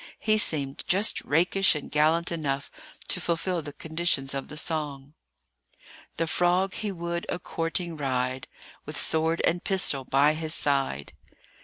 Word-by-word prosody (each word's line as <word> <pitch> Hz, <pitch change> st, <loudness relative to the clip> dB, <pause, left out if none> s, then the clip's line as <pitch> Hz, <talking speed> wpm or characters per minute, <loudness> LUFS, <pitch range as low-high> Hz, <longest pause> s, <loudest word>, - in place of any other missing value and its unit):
He 215 Hz, -1 st, +2 dB
seemed 140 Hz, -8 st, 0 dB
just 200 Hz, +4 st, +2 dB
rakish 180 Hz, +4 st, +3 dB
and 150 Hz, -, -6 dB
gallant 160 Hz, +3 st, +3 dB
enough 140 Hz, -4 st, -2 dB, 0.4 s
to -, -, +1 dB
fulfil 170 Hz, +1 st, -1 dB
the 145 Hz, -1 st, -7 dB
conditions 160 Hz, -3 st, -1 dB
of 135 Hz, 0 st, -4 dB
the 150 Hz, -, -8 dB
song:— 150 Hz, -3 st, -3 dB, 1.0 s
"The 165 Hz, -, +1 dB
frog 180 Hz, +3 st, +1 dB
he 210 Hz, -2 st, -3 dB
would 170 Hz, -1 st, -4 dB
a -, -, -1 dB
courting 170 Hz, 0 st, -3 dB
ride, 130 Hz, -2 st, -2 dB, 0.4 s
With 150 Hz, 0 st, -7 dB
sword 160 Hz, +2 st, +2 dB
and 175 Hz, +1 st, +1 dB
pistol 185 Hz, -8 st, +2 dB
by 140 Hz, +3 st, +3 dB
his 155 Hz, 0 st, 0 dB
side." 135 Hz, -, 0 dB
160 Hz, 145 wpm, -27 LUFS, 140-175 Hz, 1.0 s, rakish